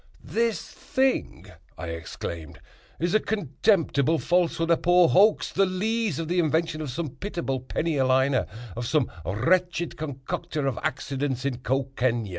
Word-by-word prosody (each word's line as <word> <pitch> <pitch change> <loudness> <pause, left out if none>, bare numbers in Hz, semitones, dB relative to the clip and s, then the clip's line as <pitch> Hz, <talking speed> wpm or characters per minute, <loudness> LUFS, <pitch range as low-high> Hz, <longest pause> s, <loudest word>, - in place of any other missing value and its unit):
"This 230 -1 -1
thing," 265 -1 -1 0.3
I 85 0 -5
exclaimed, 80 -1 -6 0.4
"is 175 +3 0
a 215 - +5
contemptible 165 - +1
falsehood—a 170 -1 +2
poor 175 -1 +5
hoax—the 195 -1 +4
lees 215 - 0
of 165 - -3
the 180 +2 +1
invention 160 0 +1
of 150 - -4
some 150 +5 -3
pitiable 165 -4 -3
penny 155 +5 -2
a 135 - +3
liner—of 125 -4 0
some 150 -3 +1
wretched 175 - 0
concoctor 145 0 -4
of 135 -4 -1
accidents 135 -1 -2
in 130 -3 -1
Cocaigne. 130 -4 0
155 Hz, 130 wpm, -26 LUFS, 130-180 Hz, 0.4 s, a